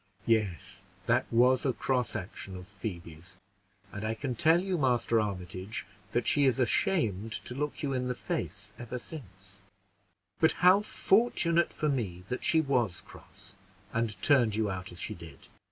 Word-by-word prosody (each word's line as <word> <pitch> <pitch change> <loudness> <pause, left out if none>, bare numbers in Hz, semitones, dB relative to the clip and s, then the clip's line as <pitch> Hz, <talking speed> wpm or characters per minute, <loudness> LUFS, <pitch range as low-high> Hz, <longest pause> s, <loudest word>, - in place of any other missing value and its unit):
"Yes, 95 -4 0 0.2
that 120 +4 +2
was 125 +2 +4
a 130 - +1
cross 125 -2 -1
action 95 0 -6
of 90 0 -10
Phoebe's; 90 -4 -7 0.5
and 105 - -6
I 110 +1 -1
can 130 +2 -3
tell 165 +5 +4
you, 185 -2 -1
Master 120 -4 +2
Armitage, 95 0 -5 0.3
that 120 - 0
she 145 -1 +3
is 130 -1 +3
ashamed 115 - +1
to - - -2
look 150 +3 -3
you 140 -2 0
in 125 -1 -1
the 125 - -1
face - - -4
ever 120 +1 -5
since; 100 - -11 0.8
but 160 - +4
how 185 +3 +6
fortunate 190 -6 +2
for 155 - -2
me 105 -11 -2
that 125 - -3
she 160 - +4
was 125 - 0
cross, - - -15 0.4
and 115 -5 -1
turned 125 -7 +4
you 110 -2 0
out 95 -1 -5
as 85 - -11
she - - -3
did! - - -12
120 Hz, 165 wpm, -30 LUFS, 95-140 Hz, 0.8 s, how